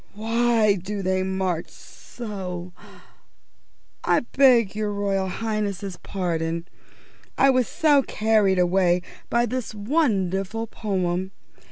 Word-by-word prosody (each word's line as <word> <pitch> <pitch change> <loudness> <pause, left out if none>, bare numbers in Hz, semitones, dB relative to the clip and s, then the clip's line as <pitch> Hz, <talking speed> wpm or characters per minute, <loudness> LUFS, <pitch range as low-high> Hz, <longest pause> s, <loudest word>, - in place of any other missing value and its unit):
"_Why 225 -3 +2
do 200 +2 -4
they 185 0 +1
march 185 -3 -2
so 185 -6 -8
_ - - -19 1.2
I - - +3
beg 245 -7 +5
your 210 -1 -1
Royal 200 -2 -1
Highness's 200 -3 -3
pardon. 170 -3 -2 0.7
I 270 - +5
was 255 -2 +2
so 295 -3 +3
carried 215 -6 +2
away 180 0 +2 0.3
by 235 0 +2
this 240 -2 -4
wonderful 205 - 0
poem. 190 -4 -2
200 Hz, 110 wpm, -24 LUFS, 185-225 Hz, 1.2 s, beg